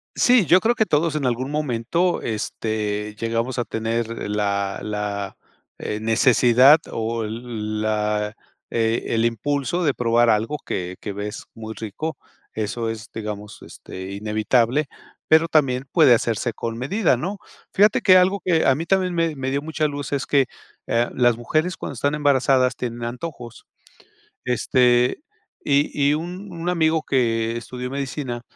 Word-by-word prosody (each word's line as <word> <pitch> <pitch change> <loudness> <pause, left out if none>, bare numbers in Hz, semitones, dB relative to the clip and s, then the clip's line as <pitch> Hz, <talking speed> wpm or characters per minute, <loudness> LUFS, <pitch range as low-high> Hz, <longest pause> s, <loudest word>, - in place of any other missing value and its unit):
Sí, 245 -6 +4
yo 180 +6 +6
creo 230 +4 +2
que 220 - +1
todos 155 -1 +1
en 150 -3 -1
algún 125 +2 -1
momento, 150 +5 0
este, 105 -1 -3
llegamos 115 +3 -1
a 120 - 0
tener 115 0 -3
la, 100 -1 -1
la, 105 -2 -4 0.4
eh, 105 - -4
necesidad, 125 +5 +5
o, 115 0 -2
el 110 -1 -4
la 105 0 -1 0.4
e 115 0 0
el 115 0 +2
impulso 140 +8 -1
de 145 -4 +2
probar 120 0 +2
algo 115 +7 +1
que 90 0 -4
que 105 - -5
ves 105 +2 -6
muy 110 -1 -7
rico, 135 +10 -5 0.3
eso 115 +2 -3
es, 115 0 -7
digamos, 105 -1 -6
este, 95 +1 -9
inevitable, 110 +7 +1 0.4
pero 160 +1 +5
también 135 -5 +1
puede 150 -8 +6
hacerse 115 +1 -1
con 115 +1 -5
medida, 150 - +1
¿no? 190 +11 -4 0.3
Fíjate 210 +2 +4
que 185 -2 +6
algo 190 +2 +3
que 165 -3 +2
a 135 - +5
mí 160 +5 -4
también 185 -1 +1
me 165 -2 0
me 130 -1 -3
dio 140 +1 -1
mucha 155 0 -1
luz 145 -1 -5
es 140 -1 -1
que, 140 -2 +3 0.4
ah, 120 +1 +1
las 120 -2 +3
mujeres 155 +9 -1
cuando - - -6
están 140 +4 0
embarazadas 135 -3 +3
tienen 120 -1 -4
antojos. 120 -1 -7 0.8
Este, 125 - +2 0.4
y 140 +1 +2 0.2
y - - +3
un 180 +5 -6
un 170 0 -5
amigo 160 -2 +2
que 115 -4 0
estudió 125 +2 -6
medicina 135 -3 -4
125 Hz, 155 wpm, -22 LUFS, 110-150 Hz, 0.8 s, yo